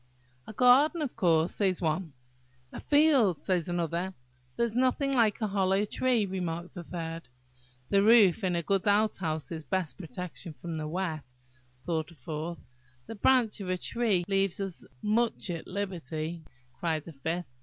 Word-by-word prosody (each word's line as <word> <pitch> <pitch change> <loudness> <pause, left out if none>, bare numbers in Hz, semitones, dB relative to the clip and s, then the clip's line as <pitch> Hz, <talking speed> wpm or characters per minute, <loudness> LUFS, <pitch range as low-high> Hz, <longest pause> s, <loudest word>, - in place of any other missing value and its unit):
"A - - -8
garden, 275 - +5
of 275 - -4
course," 170 -5 +2
says 190 -3 +1
one. 160 -1 -1 0.6
"A - - -7
field," 285 - +4
says 180 -3 -1
another. 175 +2 -2 0.4
"There 235 - +2
is 230 -1 -4
nothing 260 +2 +2
like 225 -5 +3
a - - +2
hollow 195 0 +1
tree," 240 0 +1
remarked 180 -2 -4
a 175 - -6
third. 165 -2 -6 0.6
"The 200 - +5
roof 215 -2 +6
of 185 -3 0
a 170 - -1
good 195 +3 0
outhouse 190 -8 +1
is 160 -2 -5
best 155 -1 -2
protected 180 -1 -7
from 165 0 -5
wet," 160 -6 -3 0.5
thought 160 -3 -1
a 170 - -15
fourth. 155 +4 -6 0.4
"The - - -7
branch 230 0 +3
of 185 - -5
a 185 - 0
tree 205 -3 0
leaves 195 -1 +1
us 195 -3 -4 0.2
most 225 +2 +1
at 165 -2 -6
liberty," 170 -4 -4 0.3
cried 160 -1 -2
a 165 - -8
fifth. 165 +5 -3
185 Hz, 160 wpm, -29 LUFS, 165-210 Hz, 0.6 s, roof